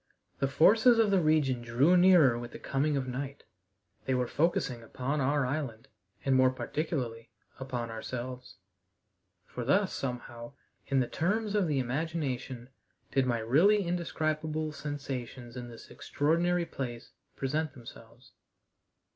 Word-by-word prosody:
The 135 - +2
forces 220 - +5
of 220 -3 +3
the 195 -2 +4
region 150 -6 +2
drew 125 +9 +3
nearer 175 -8 +6
with 120 0 -8
the - - -6
coming 145 +2 0
of 130 -1 -2
night. 135 +2 -5 0.6
They 130 - +1
were 125 0 +1
focusing 140 -4 0
upon 130 +5 -3
our 140 +1 +2
island, 125 -5 -4 0.4
and 135 -1 +3
more 130 0 +5
particularly 130 -4 -3 0.3
upon 125 -3 -4
ourselves. 125 0 -6 0.9
For 125 - -6
thus, 190 - +2
somehow, 120 -1 -5 0.3
in 135 -1 +2
the 125 - -1
terms 210 - -1
of 205 -4 +2
the 150 -3 0
imagination, 130 -2 -3 0.4
did 135 -1 +2
my 120 -2 +1
really 180 - +4
indescribable 155 -2 -2
sensations 135 -5 -6
in 125 -1 -6
this 115 -1 -12
extraordinary 170 +4 0
place 120 -6 -6 0.2
present 150 +2 -2
themselves. 120 -1 -14
135 Hz, 135 wpm, -30 LUFS, 125-160 Hz, 0.9 s, nearer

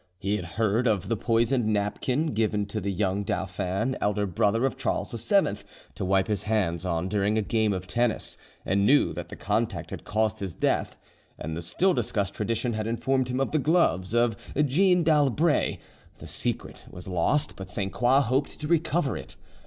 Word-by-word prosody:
He 100 +3 -1
had 90 - -6
heard 115 +2 +2
of 105 -4 0
the 115 - +2
poisoned 115 +2 +1
napkin 125 +8 0
given 105 -2 +1
to 105 +1 -4
the 100 +1 -1
young 95 +1 0
dauphin, 95 +5 -2
elder 105 0 +1
brother 105 +6 +1
of 135 - 0
Charles - - -2 0.2
VII, - - +3 0.4
to - - -5
wipe 95 0 +2
his 105 -2 -1
hands 95 -5 0
on 85 +1 -1
during 105 +2 +1
a 110 - +1
game 110 0 +1
of 95 -1 -3
tennis, 120 +3 0 0.3
and 100 +1 +2
knew 140 +8 +4
that - - -6
the - - -7
contact - - -2
had - - -6
caused 110 0 0
his 95 -4 -5
death; - - 0 0.4
and 80 0 -5
the 85 - -4
still 180 - +1
discussed 100 - -1
tradition 115 +3 -1
had 110 0 -2
informed 130 +2 0
him 125 +1 -1
of 135 - 0
the 155 - +2
gloves 120 - +2
of 120 -2 +3 0.2
Jeanne 175 +6 +3
d'Albret; 150 0 +2 0.4
the - - -11
secret - - -4
was 90 +1 -9
lost, 120 - +1
but 95 -1 -8
Sainte 95 +1 -3
Croix 125 +3 +4
hoped 135 +2 -1
to 150 - -4
recover 160 -3 +1
it. - - -8
110 Hz, 185 wpm, -27 LUFS, 100-130 Hz, 0.4 s, knew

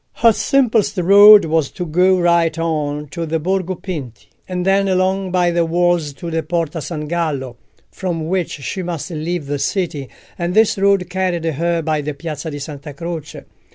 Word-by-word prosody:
Her 230 -1 +4
simplest 235 -6 +1
road 200 +3 +8
was 160 -3 0
to 180 - -6
go 180 +3 +3
right 170 -2 +2
on 150 -3 -2
to 165 +3 -5
the 165 +1 0
Borgo 185 +2 -1
Pinti, 150 - -7 0.2
and 180 -1 -2
then 195 +1 +3
along 190 0 0
by 175 -1 +2
the 170 0 +1
walls 170 -2 +1
to 170 +4 -7
the 165 0 0
Porta 165 0 -2
San 150 -1 -5
Gallo, 145 -7 -2 0.3
from 170 -4 -4
which 180 -1 -1
she 145 +7 -5
must 175 0 -5
leave 165 0 -3
the 145 0 -3
city, 150 -4 -2 0.3
and 175 +2 -2
this 220 +1 +4
road 195 -2 +2
carried 180 -2 -2
her 165 +2 -1
by 155 -1 0
the 145 0 -5
Piazza 155 +1 -6
di 145 - -6
Santa 145 0 -8
Croce. 165 0 -6
170 Hz, 180 wpm, -18 LUFS, 155-185 Hz, 0.3 s, road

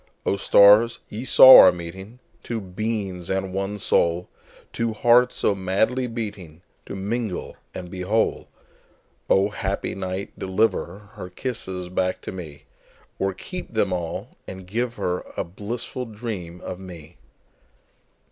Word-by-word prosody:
O, - - +1
stars, 105 +4 +5
ye 110 +4 -6
saw 130 0 +10
our 95 - +9
meeting, 95 +6 -9 0.2
Two 115 -2 -4
beings 95 -2 -4
and 95 0 -2
one 100 +2 -3
soul, 85 -2 +1 0.4
Two 115 -1 -1
hearts 120 +3 +4
so - - +1
madly 100 +7 0
beatingTo 100 -9 -7 0.3
mingle 105 0 -4 0.2
and 90 -1 -7
be 90 - -6
whole!O, 100 -1 -2
happy 100 -1 -3
night, 95 0 -5
deliverHer 100 -1 -2
kisses 95 -8 -4
back 90 0 -1
to - - -6
me, 80 -6 -9 0.6
Or 95 0 0
keep 180 - -8
them 100 -4 +1
all, 85 -2 -4 0.2
and 95 -1 -9
give 120 +5 -2
herA 90 -4 -3
blissful 115 +7 -6
dream 105 -6 -7
of 90 - -7
me! 85 -3 -12
95 Hz, 125 wpm, -23 LUFS, 90-110 Hz, 0.6 s, saw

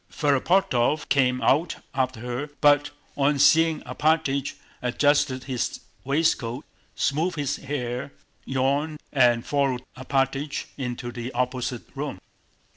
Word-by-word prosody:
Ferapóntov 145 -1 +2
came 130 -2 +2
out 155 +5 +3 0.2
after 130 -4 -1
her, 125 +4 -4
but 145 -1 +4 0.3
on 145 +1 +2
seeing 160 +2 +5
Alpátych 150 -3 0 0.3
adjusted 130 0 +2
his 130 -3 -3 0.2
waistcoat, 140 -3 0 0.3
smoothed 160 +6 0
his 145 -2 -1
hair, 135 -1 -4 0.3
yawned, 140 +4 0
and 120 -4 +4
followed 135 -3 0
Alpátych 135 +2 -1
into 125 -2 -4
the 120 +1 -5
opposite 125 -1 -2
room. - - -4
135 Hz, 110 wpm, -25 LUFS, 125-145 Hz, 0.3 s, seeing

